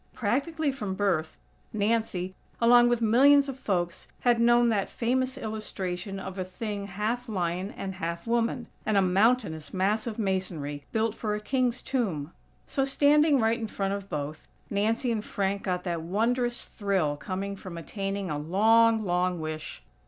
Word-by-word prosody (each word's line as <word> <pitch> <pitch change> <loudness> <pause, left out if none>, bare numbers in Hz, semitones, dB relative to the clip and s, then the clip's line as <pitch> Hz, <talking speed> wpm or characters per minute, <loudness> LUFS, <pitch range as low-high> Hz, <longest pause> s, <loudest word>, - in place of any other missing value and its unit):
Practically 285 +7 0
from 210 -8 -4
birth, 175 -6 0 0.3
Nancy, 205 -4 0 0.3
along 240 +1 +6
with 240 -1 +1
millions 275 +6 +6
of 270 -1 -6
folks, 175 -7 -2
had 240 -2 +3
known 240 0 +5
that 205 -3 0
famous 255 +2 0
illustration 195 -4 -4
of 190 0 -6
a - - 0
thing 200 +2 -5
half 220 +5 -2
Lion 180 -1 -1
and 190 -1 -4
half 170 -2 -4
woman; 235 +1 0 0.2
and 215 -2 +1
a - - +6
mountainous 195 -4 +1
mass 205 +5 +1
of 220 - -4
masonry, 180 -8 -2
built 220 -1 +1
for 215 -2 -2
a - - -3
king's 250 +2 0
tomb. 180 - -2 0.3
So, 270 - -1
standing 290 +1 +4
right 225 +1 +2
in 225 - -3
front 195 -2 -2
of 200 -1 -5
both, 150 +1 -5 0.2
Nancy 220 +4 +1
and 215 -2 -1
Frank 200 -2 -1
got 180 -2 -2
that 170 -3 -2
wondrous 240 +7 0
thrill 190 -8 0
coming 195 +5 -4
from 185 -3 -8
attaining 195 +1 -4
a 145 - -2
long, 220 +7 +4
long 180 -1 +1
wish. 155 - -6
205 Hz, 160 wpm, -28 LUFS, 185-235 Hz, 0.3 s, along